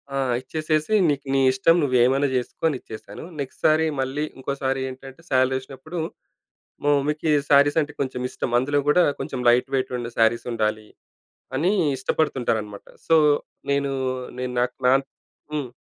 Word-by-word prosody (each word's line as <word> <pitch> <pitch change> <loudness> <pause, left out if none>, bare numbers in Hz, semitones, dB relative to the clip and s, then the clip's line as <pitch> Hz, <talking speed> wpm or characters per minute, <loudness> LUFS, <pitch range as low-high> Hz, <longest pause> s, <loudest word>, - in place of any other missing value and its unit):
ఆ! - - 0 0.2
ఇచ్చేసేసి, 155 +6 -1
నీక్ 145 -2 0
నీ 135 - +3
ఇష్టం, 130 +6 +3
నువ్వేమైనా 130 +1 +3
చేసుకో 125 - -4
అని 150 -4 0
ఇచ్చేశాను. 110 -2 -10 0.2
నెక్స్ట్ 135 -2 -6
సారీ 160 +1 +4
మళ్ళీ, 135 +3 -2
ఇంకోసారి 135 0 -2
ఏంటంటే, 135 +4 -11
శాలరేషినప్పుడు, 130 +5 -1 0.9
మా 145 - +2
మమ్మీకి 150 +2 0 0.2
శారీసంటే 145 +1 +4
కొంచమిష్టం. 125 -2 -3
అందులో 145 +3 +1
కూడా 175 +4 +5 0.2
కొంచం 130 - -4
లైట్ 120 +1 +3
వెయిటున్న 125 -2 -2
శారీసుండాలి 110 -2 +1 0.7
అనీ 170 +8 +2 0.3
ఇష్టపడుతుంటారనమాట 120 -7 -1 0.2
సో, 165 - +5 0.6
నేనూ, 140 -1 0 0.5
నేను 125 0 -3
నాకు 125 - -1
నా 130 - +6 0.6
హ్మ్. 145 -5 -3
135 Hz, 125 wpm, -23 LUFS, 125-150 Hz, 0.9 s, నా